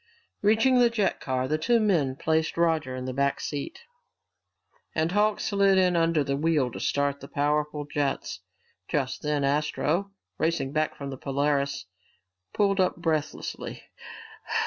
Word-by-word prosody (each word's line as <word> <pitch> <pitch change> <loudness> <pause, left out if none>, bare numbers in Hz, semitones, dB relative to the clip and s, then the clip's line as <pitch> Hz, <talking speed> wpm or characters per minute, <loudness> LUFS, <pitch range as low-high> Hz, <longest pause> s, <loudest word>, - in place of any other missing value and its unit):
Reaching 225 +5 +4
the 240 -1 +5
jet 215 -4 0
car, 130 -1 -1
the 155 +2 0
two 235 +8 +3
men 165 -12 +2
placed 160 +3 0
Roger 160 -6 +1
in 130 0 -5
the 130 - -3
back 140 +1 0
seat, 145 - -5 1.1
and 160 +1 +1
Hawks 210 +2 +1
slid 200 -2 +3
in 180 -1 +3
under 165 -2 +2
the 140 0 -1
wheel 145 -4 +1
to - - -7
start 140 0 0
the 140 - -10
powerful 150 +1 -1
jets. 145 -1 -2 0.5
Just 130 -3 -2
then 150 -1 0
Astro, 150 +6 0 0.3
racing 155 -4 0
back 155 +1 0
from 140 -1 -6
the 135 - -6
Polaris, 140 -2 -1 0.7
pulled 200 -1 +1
up 185 - +2
breathlessly. 160 -3 -3
150 Hz, 145 wpm, -27 LUFS, 140-180 Hz, 1.1 s, the